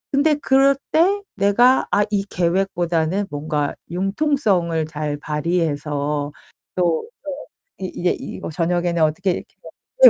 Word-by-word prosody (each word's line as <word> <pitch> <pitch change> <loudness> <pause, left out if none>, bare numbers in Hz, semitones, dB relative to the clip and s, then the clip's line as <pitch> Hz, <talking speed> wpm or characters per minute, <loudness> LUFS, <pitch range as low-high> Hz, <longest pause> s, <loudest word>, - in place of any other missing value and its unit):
근데 300 +2 +4
그럴 275 -1 +4 0.2
때 380 +6 +3
'내가 220 +6 +4
아 205 - +4
이 200 -1 +1
계획보다는 175 0 0
뭔가 145 0 -2 0.2
융통성을 195 - +1
잘 150 -1 -3
발휘해서 150 -2 -1 0.4
또 175 - +1
또 290 -1 -6 0.3
이 185 -1 -4
이제 175 0 +1
이거 - - -6
저녁에는 175 +1 0
어떻게 160 +5 +1
이렇게' - - -6 0.5
네 - - +13
175 Hz, 255 characters per minute, -21 LUFS, 155-210 Hz, 0.5 s, 네